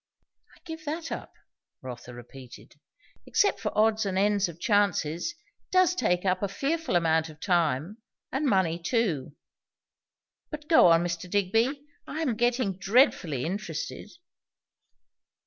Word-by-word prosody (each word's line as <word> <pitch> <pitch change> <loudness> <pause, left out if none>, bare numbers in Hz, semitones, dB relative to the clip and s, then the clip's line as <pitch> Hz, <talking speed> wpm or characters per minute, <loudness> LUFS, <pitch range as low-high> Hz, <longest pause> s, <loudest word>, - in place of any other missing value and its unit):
"I - - -23
give 320 -2 -8
that 320 +2 -4
up," - - -6 0.5
Rotha 125 -1 -8
repeated. 125 +1 -13 0.5
"Except 405 - +2
for 210 - -2
odds 220 0 +3
and 195 -2 -2
ends 205 -1 +2
of 170 0 -11
chances, 200 - +1
it - - -31 0.3
does 370 -1 +4
take 180 - 0
a 185 +2 +1
fearful 285 - -2
amount 160 -1 +2
of 150 -1 -14
time, 170 - 0 0.3
and 280 +3 -1
money 185 -7 +2
too. 165 - -1 1.1
But 300 -1 -8
go 320 - +6
on, 165 0 +5
Mr. 175 +1 -4
Digby; 225 +9 0 0.2
I 315 - -4
am 255 -7 0
getting 240 -4 0
dreadfully 190 - +2
interested." 200 +6 -5
200 Hz, 130 wpm, -27 LUFS, 170-255 Hz, 1.1 s, go